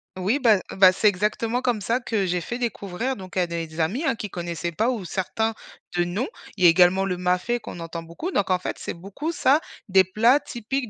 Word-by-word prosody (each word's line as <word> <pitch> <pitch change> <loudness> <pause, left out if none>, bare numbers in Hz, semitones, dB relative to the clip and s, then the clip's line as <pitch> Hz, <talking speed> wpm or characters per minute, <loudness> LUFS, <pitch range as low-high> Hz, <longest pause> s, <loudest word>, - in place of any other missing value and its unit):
Oui, 195 +9 0
bah 225 -7 +5
bah, 190 -1 +6
c'est 210 +3 +2
exactement 215 +5 0
comme 245 -4 0
ça 230 +5 0
que 220 -5 -1
j'ai 180 -1 -1
fait 240 +7 -4
découvrir, 230 +1 -3
donc, 185 -1 -9
à 180 - +3
des 165 -1 -5
amis, 190 - 0
hein, 305 - +1
qui 210 -4 -6
connaissaient 170 -1 -4
pas 220 +8 +1
ou 230 -7 -3
certains 220 +5 -1 0.4
de 175 - +3
nom. 190 +8 -2 0.3
Il 185 - -2
y - - +9
a - - +9
également 180 +2 +4
le 180 -2 -2
mafé, 180 +7 0
qu'on 180 - -9
entend 165 0 -6
beaucoup. 170 - -6
Donc, 200 - 0
en 185 - +3
fait, 180 - -5
c'est - - -5
beaucoup 200 - -5
ça, 290 -3 +3 0.3
des 190 0 +6
plats 225 +9 +4
typiques 255 -1 -4
195 Hz, 225 wpm, -24 LUFS, 180-240 Hz, 0.4 s, y